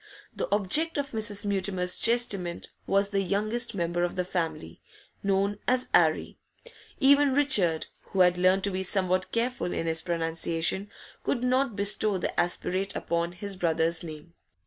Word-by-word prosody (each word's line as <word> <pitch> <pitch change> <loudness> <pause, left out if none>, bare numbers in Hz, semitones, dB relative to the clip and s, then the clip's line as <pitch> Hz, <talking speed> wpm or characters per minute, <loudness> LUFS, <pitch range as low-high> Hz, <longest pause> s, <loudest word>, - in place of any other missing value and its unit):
The - - -4
object 215 - +3
of 280 -1 -3
Mrs. 210 -2 0
Mutimer's 190 -2 0
chastisement 205 -7 +1 0.2
was 200 0 +1
the 200 -1 0
youngest 215 +5 0
member 175 -1 -2
of 175 - -2
the 180 -1 -2
family, 165 - -4 0.4
known 200 +1 0
as 255 0 +1
'Arry; - - +2 0.6
even 280 -1 +4
Richard, 200 - +2 0.2
who 190 - -1
had 180 -1 +4
learnt 185 +2 +2
to 200 - +2
be 185 0 -3
somewhat 185 -1 +1
careful 235 -5 -2
in - - -3
his 160 0 0
pronunciation, 165 +3 -1 0.3
could 240 - -2
not 255 -2 0
bestow 200 0 +3
the 180 - -3
aspirate 185 +3 -1
upon 170 0 -2
his 195 +2 -6
brother's 165 -2 0
name. 160 0 -10
195 Hz, 150 wpm, -27 LUFS, 175-215 Hz, 0.6 s, even